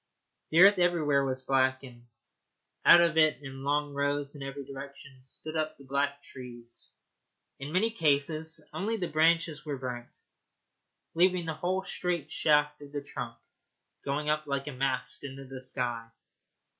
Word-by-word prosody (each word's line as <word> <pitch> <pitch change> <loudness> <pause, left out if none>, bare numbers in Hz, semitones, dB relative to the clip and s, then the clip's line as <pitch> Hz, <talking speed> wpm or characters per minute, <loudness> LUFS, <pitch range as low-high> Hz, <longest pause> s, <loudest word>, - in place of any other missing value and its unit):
The 165 +2 +5
earth 200 0 +8
everywhere 155 -6 +3
was 130 -1 -2
black, 130 0 +2
and 120 -2 -13 0.8
out 175 - +9
of 165 -2 +2
it 155 -5 +5
in 135 0 -8
long 145 +1 0
rows 145 0 -1
in 145 - -10
every 135 0 -6
direction 140 -1 -10
stood 155 +4 -8
up 155 0 -1
the 140 - -14
black 140 +1 -1
trees. 120 -2 -10 0.7
In 140 +2 -6
many 210 +7 +2
cases 155 -2 0
only 220 +4 -1
the 180 -4 -2
branches 160 -1 +2
were 145 -3 -4
burnt, 125 -2 -6 1.0
leaving 180 +1 +3
the 160 - -2
whole 185 +4 -1
straight 180 -5 -3
shaft 150 -1 +2
of 145 -1 -11
the 145 -1 -4
trunk 120 -4 -6 0.7
going 145 +2 -2
up 155 0 0
like 140 -1 -2
a - - -3
mast 130 +1 -2
into 135 -1 -7
the 130 0 -8
sky. 120 -3 -2
145 Hz, 155 wpm, -29 LUFS, 135-160 Hz, 1.0 s, out